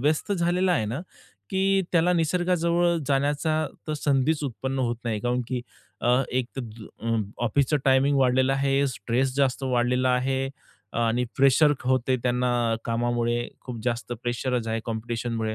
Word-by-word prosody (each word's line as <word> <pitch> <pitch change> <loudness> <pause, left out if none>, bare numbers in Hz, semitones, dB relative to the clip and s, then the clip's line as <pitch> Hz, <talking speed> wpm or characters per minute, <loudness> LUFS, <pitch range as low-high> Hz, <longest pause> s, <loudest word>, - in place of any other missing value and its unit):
व्यस्त 155 - +1
झालेला 180 +1 +2
आहे 140 - +1
ना, 120 +8 -3 0.5
की 195 0 +2
त्याला 175 +1 +4
निसर्गाजवळ 175 0 +2
जाण्याचा 145 +3 +1 0.2
तर - - 0
संधीच 145 +1 +1
उत्पन्न 135 +1 -3
होत 120 -2 0
नाही. 110 -3 -1
काउनकी 125 +1 -1 0.5
अ, 125 +2 +4
एक 125 -1 0
त - - 0 0.4
अ, 115 - -3 0.4
ऑफिसचा 140 +5 +2
टायमिंग 135 +1 +4
वाढलेला 130 0 +3
आहे, 135 +1 +2
स्ट्रेस 130 +2 -1
जास्त 135 -1 +1
वाढलेला 125 0 +1
आहे 130 +1 0 0.5
आणि 120 +1 +1
प्रेशर 140 +2 +5
होते 130 0 +2
त्यांना 125 0 +1 0.4
कामामुळे, 120 0 0
खूप 125 -2 -7
जास्त 120 0 -2
प्रेशरच 120 0 -1
आहे 110 0 -1
कॉम्पिटिशनमुळे. 115 -1 -3
130 Hz, 140 wpm, -25 LUFS, 120-150 Hz, 0.5 s, प्रेशर